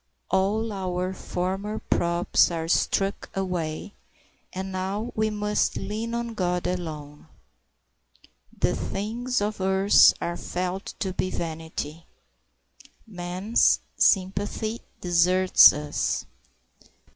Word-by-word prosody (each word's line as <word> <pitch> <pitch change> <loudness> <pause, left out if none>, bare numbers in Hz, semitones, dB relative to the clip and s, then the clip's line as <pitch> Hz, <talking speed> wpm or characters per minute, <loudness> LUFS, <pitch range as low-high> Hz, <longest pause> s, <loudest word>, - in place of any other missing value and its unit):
All 210 +4 +1
our 185 -1 -2
former 190 +4 -3
props 170 -3 +2
are 165 -2 -3
struck 195 +3 0
away, 180 -2 -3 0.6
and 190 +1 -5
now 195 +5 -3
we 220 0 +1
must 210 0 0
lean 225 +2 -4
on 235 -1 -3
God 180 -4 -1
alone. 155 -5 -5 1.2
The - - 0
things 235 +4 -2
of 210 -1 -2
earth 190 +1 +5
are 170 0 -3
felt 185 +2 -4
to 190 -2 -1
be 185 - -1
vanity. 160 -2 -5 1.0
Man's 185 +1 +1 0.2
sympathy 205 +4 +1 0.2
deserts 180 +1 +6
us. 150 0 -2
190 Hz, 100 wpm, -25 LUFS, 175-210 Hz, 1.2 s, deserts